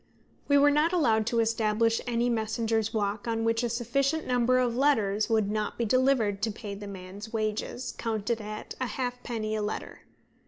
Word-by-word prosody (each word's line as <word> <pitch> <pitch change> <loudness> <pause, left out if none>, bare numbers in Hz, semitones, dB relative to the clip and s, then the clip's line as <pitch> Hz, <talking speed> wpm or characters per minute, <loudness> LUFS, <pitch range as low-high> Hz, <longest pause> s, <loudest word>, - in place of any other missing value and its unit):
We 285 - +5
were 290 +1 +6
not 305 +4 +2
allowed 225 -10 +2
to 235 -1 +2
establish 225 0 +1
any 240 0 +1
messenger's 225 -1 0
walk 205 -1 -2
on 225 -1 0
which 230 0 +1
a 240 - 0
sufficient 275 +6 0
number 250 0 +2
of 245 -2 +1
letters 215 -7 +2
would 215 -3 +2
not 215 0 -2
be 235 - 0
delivered 235 -4 +2
to 225 - +1
pay 205 -1 -7
the 205 +1 -8
man's 195 +2 -8
wages, 225 +3 -2
counted 225 0 -2
at 215 0 -7
a 255 - 0
halfpenny 240 -2 -3
a 215 - -1
letter. 210 +1 -5
225 Hz, 180 wpm, -28 LUFS, 215-245 Hz, -, were